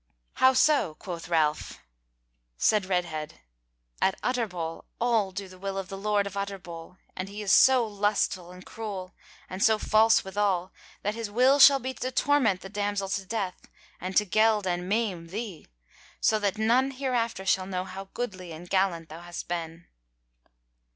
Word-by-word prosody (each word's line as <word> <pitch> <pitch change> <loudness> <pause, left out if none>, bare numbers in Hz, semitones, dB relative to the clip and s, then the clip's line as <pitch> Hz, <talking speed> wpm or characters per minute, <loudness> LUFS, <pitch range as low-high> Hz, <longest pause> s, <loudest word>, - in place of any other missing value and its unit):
"How 260 0 +7
so?" 260 - +3
quoth 170 0 -7
Ralph. 155 -3 0 0.8
Said 195 - +2
Redhead: 170 -5 -2 0.7
"At 190 - +1
Utterbol 180 -10 -2
all 230 -5 +1
do 195 +1 -6
the 185 0 -15
will 195 0 -4
of 195 -1 -4
the 195 - -6
Lord 205 0 +1
of 200 -1 -6
Utterbol, 180 -3 -6 0.2
and 185 +1 -5
he 210 +1 -6
is 195 - +2
so 260 -3 +6
lustful 205 -4 -1
and 180 0 -13
cruel, 200 -4 -6 0.3
and 185 +2 -3
so 220 -1 +5
false 220 +1 +4
withal, 190 -2 -1 0.3
that 205 - 0
his 225 -1 -5
will 255 +6 +4
shall 275 0 +9
be 260 0 -4
to 255 - -4
torment 255 -8 +2
the - - -8
damsel 205 -1 -2
to 195 0 -2
death, 200 -3 -4 0.3
and 185 +2 -3
to 210 - +5
geld 215 +1 +3
and 180 0 -2
maim 200 -6 -1
thee; 195 -2 -6 0.5
so 215 - +3
that 205 0 -1
none 240 +5 +3
hereafter 245 -7 -2
shall 190 -1 +1
know 185 -1 -2
how 190 +1 -7
goodly 185 -8 -5
and 170 +2 -10
gallant 185 -4 +1
thou 160 +2 -9
hast 175 0 -7
been." 170 -1 -5
195 Hz, 165 wpm, -27 LUFS, 180-220 Hz, 0.8 s, shall